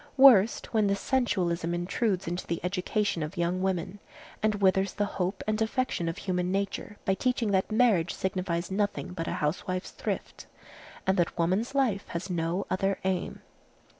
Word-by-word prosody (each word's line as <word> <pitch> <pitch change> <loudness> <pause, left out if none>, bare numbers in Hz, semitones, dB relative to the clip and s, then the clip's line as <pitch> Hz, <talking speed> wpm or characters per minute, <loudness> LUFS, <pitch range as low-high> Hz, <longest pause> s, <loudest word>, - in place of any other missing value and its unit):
Worst, 240 -7 +6
when 215 -2 +3
this 200 0 +1
sensualism 180 -10 0
intrudes 190 +2 0
into 175 +2 -3
the 170 - -1
education 185 0 0
of 155 +5 -5
young 175 +2 0
women, 190 +1 -1 0.4
and 215 -1 +2
withers 190 -1 +2
the 205 - 0
hope 190 -1 -2
and 215 +1 0
affection 220 -7 0
of 165 - -5
human 180 -1 -1
nature 200 +1 -2
by 190 - +3
teaching 240 0 0
that 190 +2 +1
marriage 215 -8 +3
signifies 185 -2 -2
nothing 205 -2 -1
but 165 -2 -4
a - - -1
housewife's 185 +5 -2
thrift, - - -5 0.6
and 190 +1 +2
that 175 -1 +1
woman's 190 +10 0
life 230 -8 +1
has 175 +3 -4
no 170 +2 -1
other 195 +1 +1
aim. 190 -1 -2
190 Hz, 165 wpm, -28 LUFS, 175-210 Hz, 0.6 s, Worst